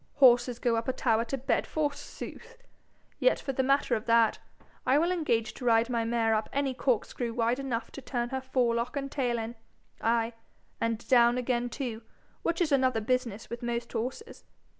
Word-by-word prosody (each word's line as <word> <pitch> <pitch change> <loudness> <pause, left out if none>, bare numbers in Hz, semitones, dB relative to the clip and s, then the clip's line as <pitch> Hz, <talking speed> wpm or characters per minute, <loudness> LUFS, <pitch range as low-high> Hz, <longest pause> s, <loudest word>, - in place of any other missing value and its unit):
Horses 245 -3 +5
go 240 -1 +1
up 225 - -2
a 260 - +1
tower 230 -3 +2
to 270 +4 -3
bed 260 +1 0
forsooth! 310 +10 -5 0.6
Yet - - +3
for 270 - -4
the 265 - +1
matter 275 +2 +2
of 215 - -5
that, 230 -1 +4 0.4
I 260 +3 +3
will 340 +4 +2
engage 235 -11 0
to 250 - -8
ride 230 +1 +3
my 230 -1 0
mare 230 -1 +1
up 215 0 0
any 275 -1 0
corkscrew 245 -2 -1
wide 235 +2 +1
enough 245 -4 -3
to 275 - -8
turn 240 -2 -2
her 265 0 -3
forelock 250 -1 0
and 275 0 -3
tail 245 -4 0
in 225 +1 -4 0.5
ay, 230 0 +1 0.5
and 230 0 -2
down 240 -1 +5
again 245 -1 0
too, 235 -3 -4 0.4
which 335 +1 -1
is 325 -3 +2
another 260 -4 +3
business 230 -1 -1
with 235 - -5
most 240 0 -3
horses. 255 - -5
245 Hz, 185 wpm, -29 LUFS, 230-270 Hz, 0.6 s, Horses